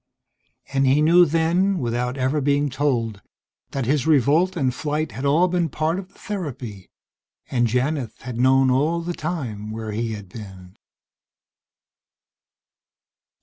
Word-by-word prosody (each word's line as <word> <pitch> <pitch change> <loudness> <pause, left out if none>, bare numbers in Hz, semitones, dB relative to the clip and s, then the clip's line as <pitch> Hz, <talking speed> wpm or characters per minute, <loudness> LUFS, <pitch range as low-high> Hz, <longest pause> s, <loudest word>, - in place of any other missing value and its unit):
And 135 0 +2
he 135 +3 +4
knew 170 +3 +6
then, 170 +5 +2
without 125 -1 -2
ever 135 +3 0
being 145 0 +1
told, 120 -7 -1 0.5
that 135 -3 -3
his 140 +2 +1
revolt 160 +5 +3
and 130 -5 +1
flight 150 +2 -2
had 130 +6 -5
all 155 +6 +4
been 175 -2 0
part 160 +5 -1
of 190 - -8
the 190 - -26
therapy, 130 - -6 0.6
and 120 -2 +2
Janith 125 0 -1
had 120 -1 -6
known 130 +1 +4
all 155 +6 +1
the 175 +1 -3
time 130 -12 -4
where 110 0 -5
he 115 +1 -2
had 105 -2 -8
been.... 95 -3 -11
135 Hz, 140 wpm, -23 LUFS, 120-160 Hz, 0.6 s, knew